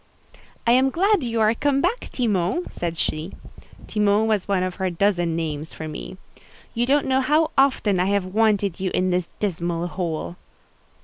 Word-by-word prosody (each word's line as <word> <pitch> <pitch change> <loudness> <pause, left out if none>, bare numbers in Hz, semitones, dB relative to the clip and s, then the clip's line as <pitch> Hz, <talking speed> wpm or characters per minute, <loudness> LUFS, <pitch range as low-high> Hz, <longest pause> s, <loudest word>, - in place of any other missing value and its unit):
"I 235 - +4
am 260 +2 +4
glad 390 +3 +2
you 230 -2 -1
are 215 +1 +4
come 275 +3 +1
back, 475 - -1
Timon," 210 - 0
said 170 -1 -4
she. 155 +3 -3 0.5
Timon 210 0 +2
was 215 -4 0
one 195 -2 +1
of 185 -1 -3
her 190 -2 0
dozen 175 -2 +1
names 155 -1 -4
for 160 - -6
me. 155 +4 -7 0.6
"You 240 +1 0
don't 285 +2 +3
know 265 0 +2
how 305 +4 +2
often 260 -8 +2
I 180 - +2
have 200 -1 +1
wanted 200 -2 +1
you 190 0 -1
in 185 0 +1
this 180 -1 -1
dismal 175 -3 -2
hole." 170 0 -4
200 Hz, 175 wpm, -23 LUFS, 175-240 Hz, 0.6 s, I